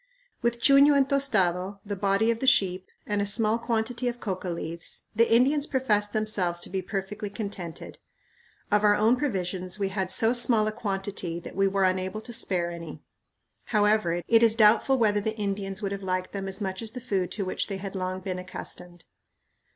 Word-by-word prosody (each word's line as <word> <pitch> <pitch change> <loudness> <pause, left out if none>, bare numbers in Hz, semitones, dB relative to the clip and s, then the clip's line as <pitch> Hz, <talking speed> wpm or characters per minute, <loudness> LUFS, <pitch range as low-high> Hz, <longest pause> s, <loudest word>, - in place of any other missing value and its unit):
With 235 0 0
chuño 280 +2 +6
and 270 -1 +3
tostado, 195 -9 0
the 205 0 -3
body 200 +3 +2
of 230 - -3
the 265 - -2
sheep, 185 -6 +3 0.2
and 205 -1 -1
a - - 0
small 220 +2 +2
quantity 235 +1 -1
of 240 0 -3
coca 185 -4 -4
leaves, 170 0 -5
the 230 +1 +3
Indians 280 +6 +3
professed 210 -6 +1
themselves 205 -5 0
to - - -6
be 190 0 -1
perfectly 200 +1 -5
contented. 200 -5 -7 0.7
Of 210 0 +3
our 205 0 +5
own 220 +4 +3
provisions 185 -8 -3
we 200 -2 -1
had 190 -1 -2
so 225 +5 +3
small 235 -3 +3
a 215 - -1
quantity 195 -5 -3
that - - -10
we 195 0 +3
were 195 0 +1
unable 185 +3 0
to 240 +2 -9
spare 175 -6 0
any. 170 -2 -9 0.6
However, 210 -5 +1
it 230 -1 +5
is 225 -1 +5
doubtful 225 +4 +4
whether 210 -3 +2
the 220 +2 -3
Indians 200 -1 -3
would 195 - -2
have 200 0 -4
liked 185 -1 -2
them 195 -1 -5
as 190 0 -1
much 190 0 -3
as 225 -1 -4
the 250 - -5
food 195 -7 -2
to 200 - -3
which 185 - -2
they 195 - -4
had 195 0 -7
long 185 0 -3
been 185 -1 -4
accustomed. 180 -1 -8
205 Hz, 195 wpm, -27 LUFS, 185-225 Hz, 0.7 s, chuño